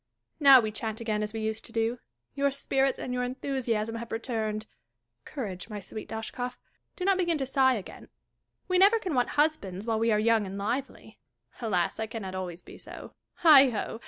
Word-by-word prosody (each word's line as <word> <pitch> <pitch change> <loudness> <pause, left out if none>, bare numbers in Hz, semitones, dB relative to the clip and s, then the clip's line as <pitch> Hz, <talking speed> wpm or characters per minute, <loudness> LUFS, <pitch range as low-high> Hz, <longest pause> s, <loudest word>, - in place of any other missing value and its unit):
Now 275 -3 +9
we 220 -2 -1
chat 220 0 -4
again 215 -2 -1
as 210 0 -2
we 225 0 -4
used 220 0 -3
to - - -9
do. 230 +2 -1 0.3
Your 280 0 +1
spirits 270 -1 0
and 250 - -4
your 250 - -1
enthusiasm 245 -4 -2
have 235 0 -8
returned. 220 -2 -3 0.6
Courage, 205 -8 -6
my 210 -1 -5
sweet 215 +2 -8
Dashkof; 245 +3 -5 0.4
do 365 - -4
not 390 -1 +3
Vjegin 345 -3 +1
to 270 - -2
sigh 265 -1 +3
again. 205 - -9 0.6
We 365 -1 +2
never 405 +4 +6
can 375 -7 -4
want 250 -2 +1
husbands 215 - 0
while 225 -1 0
we 230 0 +2
are 210 - +3
young 220 -2 +2
and 195 +1 -6
lively. 220 +1 -4 0.4
Alas! 185 -4 0
I 220 - -2
cannot 210 -4 -6
always 180 -2 -5
be - - -13
so. - - -10 0.3
Heigho 270 -8 +6
230 Hz, 190 wpm, -28 LUFS, 215-270 Hz, 0.6 s, Now